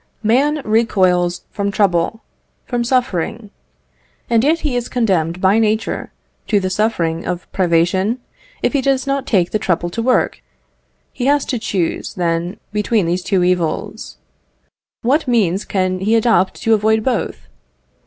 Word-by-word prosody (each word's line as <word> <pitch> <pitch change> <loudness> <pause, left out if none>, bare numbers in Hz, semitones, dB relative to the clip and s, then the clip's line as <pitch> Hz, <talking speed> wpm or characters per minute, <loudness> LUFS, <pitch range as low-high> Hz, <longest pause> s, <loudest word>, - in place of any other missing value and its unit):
Man 275 +7 +2
recoils 185 -5 +2
from 200 0 -2
trouble 200 +1 +1 0.4
from 245 -1 -1
suffering; 235 -4 -1 0.8
and 230 -1 +4
yet 320 +4 +2
he 290 -5 -1
is 245 -1 -2
condemned 180 -8 0
by 195 +4 +3
nature 220 0 -1 0.4
to 210 - +3
the 185 -1 -2
suffering 175 -6 0
of 180 0 -4
privation, 185 +5 +1 0.5
if - - +1
he 280 - +2
does 270 0 +1
not 275 -1 -1
take 180 -5 +2
the 215 - 0
trouble 175 -2 -1
to 230 - -3
work. 250 +2 +1 0.7
He 250 - -2
has 285 0 +3
to 250 - -2
choose, 185 -6 -2
then, 175 +2 -1 0.2
between 210 -1 +1
these 175 +2 0
two 185 0 +1
evils. 180 -3 -2 0.9
What 275 +5 +2
means 205 -6 +1
can 185 -1 -1
he 210 +4 +2
adopt 220 -5 +2
to 225 - +3
avoid 220 +1 +2
both? 250 -3 -2
210 Hz, 145 wpm, -18 LUFS, 180-235 Hz, 0.9 s, and